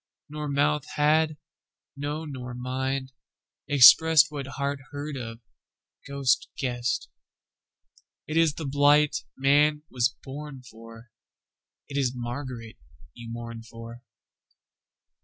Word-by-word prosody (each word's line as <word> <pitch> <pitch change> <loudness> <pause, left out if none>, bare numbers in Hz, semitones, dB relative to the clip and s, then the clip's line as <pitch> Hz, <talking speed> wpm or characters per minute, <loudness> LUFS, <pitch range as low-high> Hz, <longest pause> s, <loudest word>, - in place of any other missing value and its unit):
Nor 150 0 -5
mouth 145 +1 +1
had, 155 +1 +2 0.6
no 145 +3 -4
nor 125 -4 -7
mind, 130 +1 -3 0.6
expressedWhat 150 +1 +7
heart 140 0 -2
heard 145 +1 -6
of, 115 -2 -7 0.7
ghost 140 -1 +1
guessed:It 125 +4 -7
ís 165 -3 +3
the 160 - -5
blight 145 +2 +4 0.2
man 150 +2 +3
was 125 0 +1
born 135 -1 -8
for, 115 -1 -14 0.8
It 140 - -5
is 130 -3 0
Margaret 120 -2 -6 0.4
you 120 -1 -10
mourn 115 -1 -7
for. 115 +1 -11
135 Hz, 100 wpm, -26 LUFS, 120-150 Hz, 0.8 s, expressedWhat